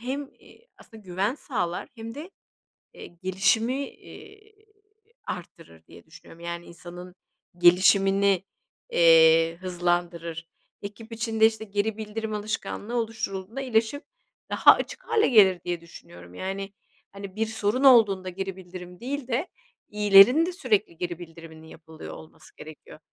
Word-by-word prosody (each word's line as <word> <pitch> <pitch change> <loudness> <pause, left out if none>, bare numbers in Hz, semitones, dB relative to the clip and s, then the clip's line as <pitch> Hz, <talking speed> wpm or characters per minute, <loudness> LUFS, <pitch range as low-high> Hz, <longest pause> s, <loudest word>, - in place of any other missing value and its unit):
Hem, 270 +3 -5
iii, 470 - -21
aslında 220 -2 -15
güven 190 +5 -2
sağlar 185 - -4
hem 225 -1 -8
de, 315 +6 -9 0.6
eee, - - -10 0.2
gelişimi, 225 +8 0
iii, 425 +1 -17 0.6
arttırır 165 - -9
diye - - -16
düşünüyorum. 165 - -16
Yani, 170 0 -6
insanın 175 +1 -11 0.4
gelişimini, 195 +2 +4 0.5
eee, 165 0 +5
hızlandırır. 175 -2 -3 0.3
Ekip 220 +3 -10
içinde, 225 -1 +2
işte, 220 0 -2
geri 205 +1 -2
bildirim 215 0 -5
alışkanlığı 215 +2 -4
oluşturulduğunda 225 -1 -4
iyileşip 245 +1 -1 0.5
daha - - +7
açık - - -6
hâle 435 - +3
gelir 195 -7 +5
diye 175 -1 -3
düşünüyorum. 90 - -14
Yani, 195 - -5 0.4
hani, 200 -1 -10
bir 225 +1 0
sorun 220 +4 -1
olduğunda 210 -8 +5
geri 190 +1 -5
bildirim 180 -1 -11
değil 270 +1 -5
de 260 +7 -1 0.4
iyilerin 210 +9 +6
de 365 - -4
sürekli 215 - -1
geri 175 0 -4
bildiriminin 165 -2 -12
yapılıyor 160 0 -11
olması 155 - -15
gerekiyor. 155 0 -13
195 Hz, 125 wpm, -25 LUFS, 175-225 Hz, 0.6 s, daha